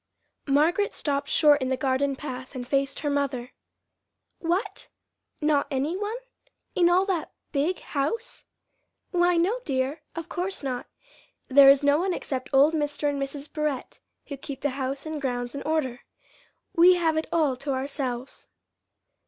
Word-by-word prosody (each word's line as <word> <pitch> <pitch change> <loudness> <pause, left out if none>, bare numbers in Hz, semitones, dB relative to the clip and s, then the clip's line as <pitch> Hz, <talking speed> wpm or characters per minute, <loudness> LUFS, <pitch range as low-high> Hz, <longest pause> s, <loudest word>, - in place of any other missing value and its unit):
Margaret 320 +9 +2
stopped 285 -1 -1
short 295 -2 +5
in 260 - -1
the 260 - 0
garden 270 +1 +1
path 260 -1 -7
and 245 -1 -5
faced 275 0 0
her 295 - -1
mother. 275 -3 -1 0.9
"What, 385 +4 -2 0.5
not 300 -2 +2
any 280 +5 -1
one? 415 +4 -3 0.6
in 345 -1 +4
all 365 +2 +4
that 370 -5 -2 0.2
big 305 +6 0
house?" 440 - -3 0.7
"Why, 350 -1 +3
no, 390 +9 +2
dear, 275 - -1
of 330 -1 -5
course 360 0 -3
not. 255 -3 -3 0.6
There 275 +1 +8
is 275 +1 +6
no 285 +1 +4
one 365 0 0
except 260 -2 -4
old 285 +3 +5
Mr. 295 -1 -1
and 280 -1 -3
Mrs. 280 +1 -5
Barrett 300 -4 -3 0.3
who 280 - -7
keep 270 0 -8
the 290 - 0
house 270 +1 -3
and 315 -2 -4
grounds 245 -2 -2
in 280 - -5
order. 290 -6 -1 0.7
We 355 +2 +7
have 330 -3 +1
it 315 - -1
all 305 -6 +2
to 275 +2 -4
ourselves." 260 -2 -3
285 Hz, 155 wpm, -26 LUFS, 270-330 Hz, 0.9 s, There